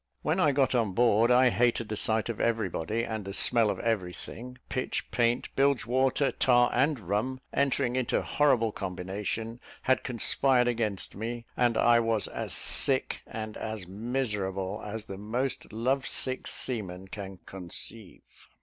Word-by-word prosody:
When 155 +5 0
I 155 -5 +4
got 135 -1 +1
on 115 -6 0
board, 115 +1 +3
I 125 0 +5
hated 120 -1 +1
the 105 - -3
sight 110 +1 0
of 115 -2 -4
every 115 -4 0
body, 105 +8 -3
and 110 -2 -4
the 100 0 -7
smell 115 -3 +4
of - - -3
every 100 -6 -1
thing; 125 +6 -8
pitch, 130 - -3
paint, 120 0 0
bilge 140 -2 +2
water, 130 +3 +1
tar 120 -1 +3
and 140 +2 +1
rum, 105 +8 -2
entering 135 -2 0
into 130 -2 0
horrible 125 -7 +2
combination, 100 +5 -5 0.2
had 130 0 +2
conspired 125 +1 +2
against 110 -5 -1
me: 115 +3 -5
and 120 -2 +1
I 120 0 +5
was 115 -2 0
as - - -5
sick - - +5
and 110 -1 -6
as 110 -4 -5
miserable 105 -3 -3
as 105 +1 -6
the 95 0 -8
most 125 +5 -3
love 130 +5 -1
sick 130 0 +1
seaman 95 -6 -3
can 95 -1 -8
conceive. 95 +3 -4
115 Hz, 160 wpm, -28 LUFS, 105-125 Hz, 0.2 s, I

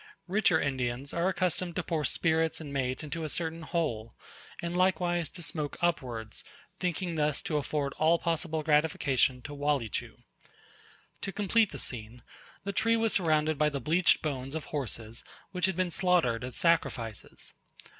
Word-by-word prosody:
Richer 185 -4 +3
Indians 130 0 -2
are 170 +2 +2
accustomed 180 -2 0
to 180 - -1
pour 160 -2 -1
spirits 160 -1 +2
and 145 -3 -7
mate 130 0 -1
into 160 +2 -4
a 155 - -2
certain 165 +1 -2
hole, 150 -10 -2 0.4
and 170 0 -3
likewise 175 -2 +2
to 175 - -6
smoke 155 -4 -3
upwards, 125 -10 -1 0.4
thinking 180 -1 -1
thus 150 -2 +1
to 155 - 0
afford 145 -1 -1
all 160 +2 +5
possible 165 -1 -1
gratification 145 -4 +2
to 145 - -7
Walleechu. 145 -6 -1 1.1
To 195 - -3
complete 210 +2 +3
the - - -6
scene, 120 0 -3 0.4
the 200 - -3
tree 230 +2 +3
was 225 -1 +1
surrounded 155 -4 +2
by 150 0 +4
the 140 -2 -3
bleached 165 +8 +3
bones 135 -2 -3
of 160 - -3
horses 115 -6 -4 0.3
which 180 -1 +1
had 190 - -1
been 185 -1 0
slaughtered 170 -12 +2
as 125 -1 -5
sacrifices. 120 - 0
155 Hz, 155 wpm, -30 LUFS, 135-175 Hz, 1.1 s, all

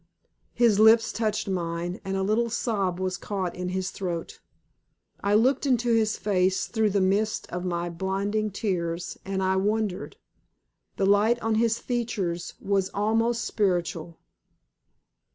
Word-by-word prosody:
His 230 -4 +4
lips 225 +1 +6
touched 215 -3 -1
mine, 175 -1 -3
and 195 0 -2
a 190 - 0
little 220 +4 +1
sob 200 -6 -1
was 185 0 -2
caught 190 -4 -3
in 180 0 -3
his 185 +1 -2
throat. 175 -4 -5 0.8
I 200 +1 +3
looked 260 +6 +3
into 240 -2 +2
his 220 -1 +2
face 190 -2 +1
through 220 -2 +1
the 200 0 +1
mist 200 +3 +1
of 180 +1 -4
my 175 -1 -1
blinding 195 +5 -1
tears, 180 -4 -3
and 190 0 -2
I 190 0 +2
wondered. 205 -1 -1 0.8
The 195 - +1
light 210 +4 +4
on 225 0 +1
his 230 +1 +2
features 205 -8 -3
was 195 -1 0
almost 225 +3 +1
spiritual. 175 -4 -1
200 Hz, 140 wpm, -26 LUFS, 185-220 Hz, 0.8 s, lips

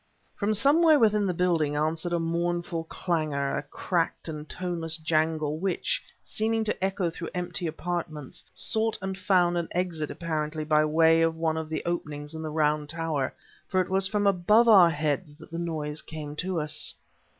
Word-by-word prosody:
From 215 0 0
somewhere 305 +7 +5
within 210 -4 +3
the - - +1
building 165 -5 +1
answered 160 +3 0
a 175 - +2
mournful 170 0 -1
clangor, 155 -5 -1
a - - -1
cracked 170 -2 -2
and 155 -1 -6
toneless 170 -3 -2
jangle, 155 -1 0
which, 190 0 -1 0.2
seeming 225 +1 0
to 210 -3 -3
echo 190 -3 0
through 165 0 -6
empty 180 -1 -2
apartments, 160 -3 -4
sought 220 0 0
and 190 0 -4
found 180 -2 +2
an 170 - -3
exit 170 -4 -1
apparently 155 -2 -3
by 155 0 +3
way 165 +1 +4
of 165 0 +2
one 160 -1 0
of 160 -1 -4
the 160 - -3
openings 150 -3 -3
in 160 - -6
the 155 - -4
round 150 -1 +1
tower; 160 -4 -1 0.4
for 185 - +1
it 185 - 0
was 190 0 +4
from 205 +1 0
above 200 +5 +4
our 190 -6 +8
heads 150 0 -2
that 155 +1 -15
the 165 - -4
noise 155 -3 -1
came 150 -2 -7
to 180 0 -1
us. 150 0 0
165 Hz, 175 wpm, -27 LUFS, 155-185 Hz, 0.4 s, our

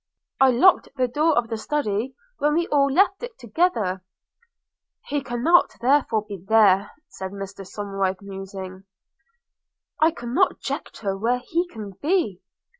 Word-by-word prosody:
'I 270 - +6
locked 350 +10 +4
the 255 -1 +2
door 300 +5 +1
of 240 -1 +2
the 225 -1 -3
Study 255 -2 -2 0.2
when 295 +1 +2
we 340 +1 +2
all 280 -1 +3
left 390 +5 +3
it 485 -2 -7
together.' 220 - 0 1.0
'He 290 0 -2
cannot 265 +8 +2
therefore 245 -4 +2
be 195 -4 -8
there,' 200 -1 +4 0.2
said 190 -9 -7
Mr 195 0 -7
Somerive, 195 -1 -3
musing 190 -1 -8 0.6
– - - -33
'I 315 - +6
cannot 300 +4 +1
conjecture 195 -3 -4
where 230 +5 0
he 335 +8 -2
can 215 - -8
be!' 315 - 0
235 Hz, 140 wpm, -23 LUFS, 195-295 Hz, 1.0 s, I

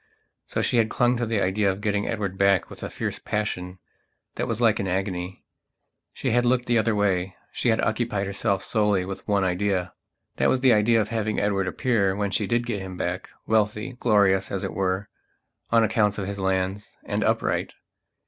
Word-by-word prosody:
So - - -1
she - - +1
had 110 -1 +3
clung 120 +2 +2
to 120 -1 -1
the 110 -2 0
idea 100 +2 +2
of 95 - -6
getting 105 -1 -1
Edward 100 -4 -2
back 100 -1 +2
with - - -10
a - - -4
fierce - - -4
passion 95 -3 -3 0.6
that - - -3
was 115 -1 -2
like 115 -2 +3
an 100 - -1
agony. 95 -1 -3 0.7
She - - -2
had 120 +1 +3
looked 125 0 +2
the 120 -2 +3
other 110 0 +1
way; 95 -3 0 0.2
she 120 - 0
had 110 - +2
occupied 110 -3 0
herself 95 0 -1
solely 105 -4 +1
with 95 0 -7
one 100 -2 +2
idea. 95 0 0 0.4
That - - +3
was 130 - +1
the 130 -3 +6
idea 115 +2 +4
of 105 - -3
having 110 -2 -1
Edward 100 -2 0
appear, 100 -1 +1
when 100 -1 -1
she - - 0
did 120 0 +1
get 110 -5 -3
him 95 -1 -7
back, 90 +1 -3 0.2
wealthy, 110 +3 0
glorious 100 -4 +3
as 95 - -2
it - - -3
were, 95 +1 -1 0.6
on 115 -1 +4
account 105 -1 +2
of 100 - -3
his 100 0 -5
lands, 95 +1 -2
and - - -1
upright. - - 0
105 Hz, 195 wpm, -25 LUFS, 95-110 Hz, 0.7 s, the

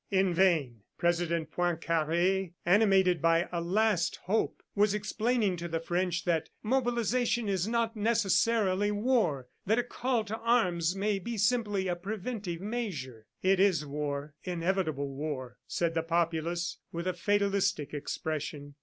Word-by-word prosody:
In 190 -2 +2
vain 160 - +2 0.2
President 170 -1 0
Poincare, 170 +2 0
animated 190 -2 +4
by 165 +1 +3
a 170 -1 -2
last 185 -1 +1
hope, 215 +4 -1
was 205 0 +3
explaining 215 -1 0
to 170 0 -4
the 165 -1 -2
French 175 +1 -1
that 165 -3 0
"mobilization 240 -1 +1
is 190 -1 0
not 230 0 0
necessarily 210 -2 +2
war, 205 - +1 0.2
that 220 +3 +3
a 245 - +2
call 245 -1 -1
to 220 +1 -5
arms 185 -7 +2
may 200 0 0
be 230 +5 -5
simply 210 -3 +1
a 175 - 0
preventive 195 -1 -5
measure." 165 - -4 0.2
"It 190 0 +3
is 190 -6 +3
war, 145 0 -4
inevitable 170 -5 -1
war," 135 -3 -5
said 170 -1 0
the 165 - +1
populace 170 +1 -1
with 170 +1 -4
a 185 - 0
fatalistic 200 -4 0
expression. 145 -1 -4
185 Hz, 135 wpm, -30 LUFS, 165-210 Hz, 0.2 s, animated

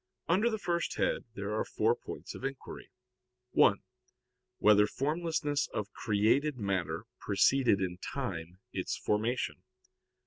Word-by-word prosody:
Under 195 +8 +3
the 220 - -1
first 170 -4 -1
head - - 0
there 100 0 -3
are 110 - +1
four - - +1
points - - -8
of - - -10
inquiry: 135 0 -6 0.6
(1) 100 - +4 0.7
Whether 105 -1 +6
formlessness 150 +1 -1
of 105 -1 -3
created 115 +7 +2
matter 100 -5 -2
preceded 110 +1 +3
in 90 -1 -2
time 90 - -4 0.2
its 95 - -2
formation? 110 +4 -1
110 Hz, 125 wpm, -31 LUFS, 100-145 Hz, 0.7 s, Whether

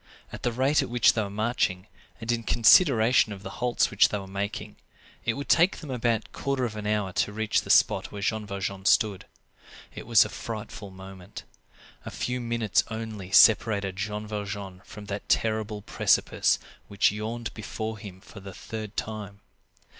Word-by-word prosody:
At - - -8
the 120 - 0
rate 135 +6 +2
at 135 - -4
which 120 -1 +4
they 110 - 0
were 100 - -3
marching, 105 -3 -1 0.3
and 115 +1 -2
in 120 -1 0
consideration 115 - +5
of 100 -1 -8
the - - -7
halts 125 -1 +1
which 105 - +5
they 105 - -2
were 100 - -7
making, 100 +2 -5 0.5
it 115 - +1
would 140 +1 -6
take 170 +3 +4
them 150 -5 -8
about 120 -3 0
a - - -17
quarter 135 -2 -2
of 110 -3 -5
an 105 -1 -5
hour 105 -3 -1
to 105 - 0
reach 110 +1 0
the - - -12
spot - - +3
where 100 -1 -6
Jean 110 0 -1
Valjean 100 -1 -4
stood. 105 -2 +2 0.7
It - - -9
was 115 -4 +6
a - - -6
frightful 110 -2 -7
moment. 95 0 -11 0.6
A - - -6
few 125 0 -3
minutes 115 -3 +1
only 110 -4 -6
separated 105 -2 +5
Jean 105 +2 -4
Valjean 100 -3 -6
from 105 -1 -10
that 100 0 -6
terrible 110 -2 0
precipice - - +2 0.3
which 100 -1 +2
yawned 110 +2 -5
before 110 +1 -5
him 95 -3 -10
for 100 - -13
the 95 -1 -10
third 110 0 -7
time. 105 -2 -5
105 Hz, 180 wpm, -26 LUFS, 100-115 Hz, 0.7 s, was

